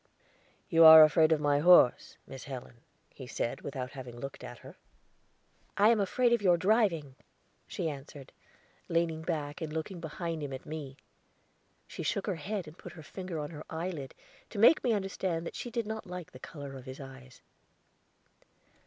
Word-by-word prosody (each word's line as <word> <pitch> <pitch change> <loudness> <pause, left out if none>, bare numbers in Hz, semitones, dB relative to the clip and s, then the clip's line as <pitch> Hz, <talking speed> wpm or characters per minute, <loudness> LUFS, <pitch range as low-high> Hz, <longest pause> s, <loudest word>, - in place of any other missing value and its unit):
"You 165 0 +5
are 160 0 +12
afraid 155 +1 +4
of 160 - +3
my 145 -1 +2
horse, 170 -6 +5
Miss 135 -2 -10
Helen," 130 -3 -8 0.4
he 130 - -10
said, 120 - -3
without 130 -2 -5
having 125 -4 -9
looked 135 +2 -8
at 120 - -9
her. 140 +6 -11 1.0
"I 210 +2 +5
am 230 -2 +3
afraid 235 +5 +2
of 235 - +2
your 180 -3 +4
driving," 185 - +1 0.5
she - - -3
answered, 140 -2 -8 0.6
leaning 165 -1 0
back 155 -1 -4
and 160 -2 -4
looking 160 +4 -5
behind 165 0 -5
him 140 -2 -5
at 130 - -8
me. 145 -3 -7 0.9
She - - -8
shook 200 - -2
her 195 -5 -2
head 195 +3 -4
and 155 +3 -13
put - - -10
her 160 - -12
finger 180 +1 -7
on 150 0 -5
her 155 -1 -8
eyelid 160 -4 -5 0.3
to 210 - -9
make 230 +10 +6
me 245 - +2
understand 190 -4 -2
that - - -6
she 240 - -5
did 235 -1 -3
not 220 -1 -6
like 180 -2 -8
the 130 - -13
color 140 -1 -9
of 130 -1 -10
his 130 0 -9
eyes. 135 -2 -12
160 Hz, 180 wpm, -30 LUFS, 140-185 Hz, 1.0 s, are